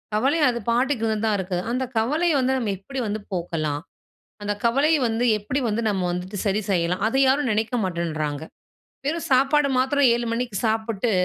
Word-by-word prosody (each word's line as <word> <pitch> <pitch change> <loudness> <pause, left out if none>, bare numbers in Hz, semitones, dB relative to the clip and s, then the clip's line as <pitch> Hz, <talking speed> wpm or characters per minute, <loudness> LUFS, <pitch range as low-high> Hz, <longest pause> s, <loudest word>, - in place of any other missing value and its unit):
கவலை 270 +9 +2
அது 235 -1 -2
பாட்டுக்கு 245 0 +1 0.2
தான் 215 - +2
இருக்கு. 185 -1 -2
அந்த 255 +2 0
கவலைய 305 +10 +2
வந்து 260 0 +1
நம்ம 230 -5 -1
எப்டி 265 +8 -7
வந்து 210 +1 -2
போக்கலாம்? 155 -4 -2 0.6
அந்த 205 0 -1
கவலைய 280 +7 +3
வந்து 225 +2 0
எப்டி 230 +7 -2
வந்து 220 +2 -1
நம்ம 190 -3 -1
வந்துட்டு 180 +3 -5
சரி 200 +1 +1
செய்யலாம்? 180 +1 0
அத 230 - -1
யாரும் 265 -1 +2
நினைக்க 220 +3 -1
மாட்டேன்றாங்க. 155 -5 -2 0.6
வெறும் 330 +3 -2
சாப்பாடு 275 +2 +4
மாத்திரம் 265 +1 +3
7:00 240 0 -1
மணிக்கு 235 -3 -2
சாப்புட்டு, 220 0 -1
225 Hz, 165 wpm, -23 LUFS, 190-265 Hz, 0.6 s, சாப்பாடு